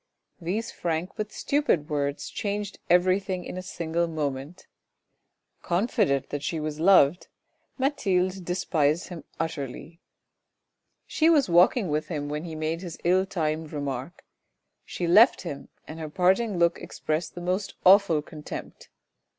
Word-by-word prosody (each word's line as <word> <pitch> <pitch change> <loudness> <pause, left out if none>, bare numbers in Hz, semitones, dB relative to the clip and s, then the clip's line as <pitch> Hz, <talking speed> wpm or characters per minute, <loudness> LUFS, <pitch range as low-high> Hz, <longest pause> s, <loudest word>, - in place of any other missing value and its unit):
These 205 +7 -2
frank 170 +1 -2
but 215 -1 -4
stupid 280 - 0
words 145 -1 -2
changed 205 -1 -3
everything 185 +1 +2
in - - -6
a 185 - -4
single 170 -1 -2
moment; 150 +1 -4 1.0
confident 180 - 0
that 145 - -3
she 160 +2 -2
was 155 0 -4
loved, 175 -2 +5 0.5
Mathilde 195 -10 0
despised 170 -2 0
him 170 -5 -8
utterly. 165 +1 -5 1.0
She 320 +1 +2
was 295 - +4
walking 180 +5 +5
with 150 0 -1
him 145 -4 -4
when 150 +3 -4
he 160 -2 -6
made 155 +2 -2
his 175 -3 -7
ill 185 +2 +3
timed 155 -3 -2
remark; 140 +1 -5 0.6
she 175 - -4
left 210 +9 +6
him, 145 -6 -7 0.2
and 160 +1 -8
her 155 -1 -5
parting 190 +5 +2
look 170 0 +2
expressed 155 +1 -3
the 175 - -6
most 185 +3 -2
awful 185 -5 +6
contempt. 150 -1 -9
170 Hz, 135 wpm, -26 LUFS, 155-190 Hz, 1.0 s, left